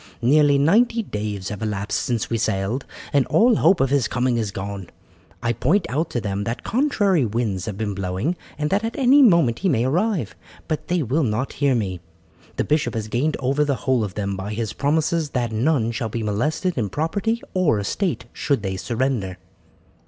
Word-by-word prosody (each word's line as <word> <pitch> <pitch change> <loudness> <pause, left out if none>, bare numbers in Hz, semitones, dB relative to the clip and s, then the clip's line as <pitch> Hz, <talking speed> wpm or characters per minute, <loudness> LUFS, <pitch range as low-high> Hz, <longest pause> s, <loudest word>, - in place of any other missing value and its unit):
Nearly 145 +2 +5
ninety 225 - +3
days 105 - -4
have 105 0 -6
elapsed 105 -2 -2
since 120 -3 -1
we 115 - -1
sailed, 105 +6 -1 0.3
and 140 -3 +3
all 220 - +4
hope 190 - +4
of 135 0 +1
his 140 -5 +2
coming 125 0 0
is 110 -3 -1
gone. 100 -2 -6 0.5
I 120 0 +1
point 165 - +1
out 155 +5 -1
to 120 - -2
them 100 -1 -3
that 115 +3 -4
contrary 205 - +2
winds 110 -5 -1
have 105 -3 -4
been 105 -2 -2
blowing, 95 - -2 0.2
and 150 0 -2
that 205 +3 +2
at 225 +1 -3
any 275 +1 +6
moment 170 - +4
he 190 - +1
may 120 -6 +2
arrive; 170 - 0 0.3
but 155 -2 -3
they 175 -2 +1
will 140 +6 0
not 125 0 -1
hear 140 -3 +2
me. 95 -6 -2 0.6
The - - 0
bishop 150 -6 0
has 110 -1 -3
gained 145 +7 0
over 135 +3 +1
the 145 -2 0
whole 130 -4 +2
of 100 -3 -5
them 100 -1 -2
by 100 +3 -5
his 110 -2 -3
promises 155 +2 0
that 120 -2 -1
none 115 0 +1
shall 115 -1 -3
be 115 +1 -3
molested 140 - -1
in 105 -4 -1
property 200 - -1
or 180 - +2
estate 165 - -2
should 140 -8 -1
they 95 -1 -2
surrender." 115 -4 -2
125 Hz, 195 wpm, -22 LUFS, 105-160 Hz, 0.6 s, any